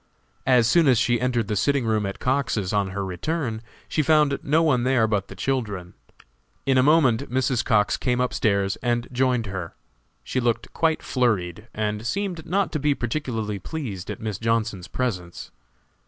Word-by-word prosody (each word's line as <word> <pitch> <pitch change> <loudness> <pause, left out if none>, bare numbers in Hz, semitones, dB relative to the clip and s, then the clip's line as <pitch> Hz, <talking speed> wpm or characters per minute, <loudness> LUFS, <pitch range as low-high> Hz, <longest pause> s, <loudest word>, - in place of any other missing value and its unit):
As 125 -3 +5
soon 165 +3 +4
as 130 -3 +5
she 120 +1 +2
entered 120 -4 0
the 105 - -1
sitting 135 +5 +1
room 110 -2 +1
at 100 - -5
Cox's, 125 -7 0
on 100 -2 +1
her 100 +1 -4
return, 110 - -3 0.3
she 155 - 0
found 150 -2 +3
no 155 +4 +2
one 135 -6 +3
there 125 -2 +3
but 105 -3 -1
the 100 - -10
children. 100 -5 -2 0.7
In 135 -1 +3
a 130 - +5
moment 140 -3 +3
Mrs. 125 -1 +1
Cox 105 -4 +2
came 125 -1 0
up 125 0 0
stairs 100 -2 +1
and 120 0 -1
joined 125 -2 +1
her. 95 -4 -6 0.5
She 130 - -2
looked 120 -2 -1
quite 160 -1 +1
flurried, 105 -5 0
and 105 0 -2
seemed 195 -3 -3
not 195 +3 +1
to 155 - -2
be 145 0 +2
particularly 115 -6 -3
pleased 105 - -6
at - - -5
Miss 110 -3 -4
Johnson's 115 -5 -1
presence. 90 -9 -4
120 Hz, 175 wpm, -24 LUFS, 105-135 Hz, 0.7 s, As